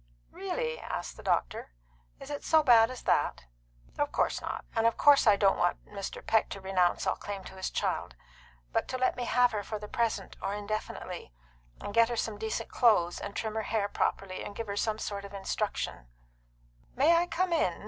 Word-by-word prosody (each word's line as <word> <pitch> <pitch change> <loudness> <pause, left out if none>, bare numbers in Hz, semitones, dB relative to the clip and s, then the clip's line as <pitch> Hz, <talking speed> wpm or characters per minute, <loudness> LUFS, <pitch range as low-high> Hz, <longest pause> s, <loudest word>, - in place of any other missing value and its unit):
"Really?" 160 -5 -3
asked - - -5
the - - -11
doctor. - - -1 0.5
"Is 275 +1 -9
it 290 - -4
so 315 -1 +4
bad 230 -4 +7
as 255 -1 -8
that?" - - +1 0.5
"Of - - +1
course - - 0
not. - - -5
And 225 0 +4
of 230 - 0
course 285 -4 +6
I 210 - +8
don't 195 -1 +3
want 175 - 0
Mr. 200 -2 -7
Peck 220 - +2
to 195 - -6
renounce 190 -2 +1
all - - +1
claim 200 -2 -6
to - - -10
his 190 0 -3
child; 60 - -2 0.6
but - - 0
to 255 - -3
let 255 0 +1
me 245 - -3
have 245 +1 +4
her 210 - -2
for 215 +2 -5
the 210 0 -8
present, 220 -4 -2
or 200 - -2
indefinitely, 210 - -5 0.5
and 205 - -6
get 230 +1 +5
her 240 - -2
some 220 -2 -2
decent 220 0 -3
clothes, 205 -8 +3
and 200 - -6
trim 220 -1 -2
her 220 - -1
hair 210 -1 0
properly, 195 -2 -2
and 205 - -7
give 230 - -4
her 200 -1 -4
some 215 +1 0
sort 200 -2 -4
of 200 0 -9
instruction 195 - -3 0.4
" - - -34
"May 300 +6 +5
I 345 +1 +3
come 350 +1 0
in?" 185 - +1
210 Hz, 210 wpm, -30 LUFS, 195-235 Hz, 0.6 s, I